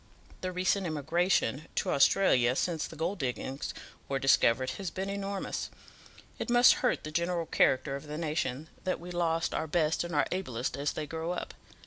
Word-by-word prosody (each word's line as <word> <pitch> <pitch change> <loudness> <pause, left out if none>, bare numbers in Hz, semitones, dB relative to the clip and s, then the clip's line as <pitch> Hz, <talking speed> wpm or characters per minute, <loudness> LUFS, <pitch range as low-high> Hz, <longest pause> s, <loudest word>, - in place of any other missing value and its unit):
The 185 - -2
recent 185 +1 +1
emigration 155 -2 +1
to - - 0
Australia 130 -5 +4
since 165 +1 -1
the - - -11
gold 170 +6 -2
diggings 130 +1 -3 0.4
were 135 - 0
discovered 130 -2 +3
has 190 -3 -3
been 190 +3 -4
enormous. 200 0 -3 0.7
It - - -3
must 245 +1 +7
hurt 250 - +1
the 155 - -6
general 170 +1 0
character 135 -2 +2
of 140 +2 -8
the 150 +1 -5
nation 150 -3 -2 0.2
that 185 - -1
we 175 +1 -8
lose 165 -2 0
our 160 - -1
best 160 0 +1
and 170 0 -5
our - - +3
ablest 130 -10 -2
as 145 +1 -1
they 155 - -3
grow 160 +3 -3
up. - - -5
160 Hz, 175 wpm, -30 LUFS, 140-180 Hz, 0.7 s, must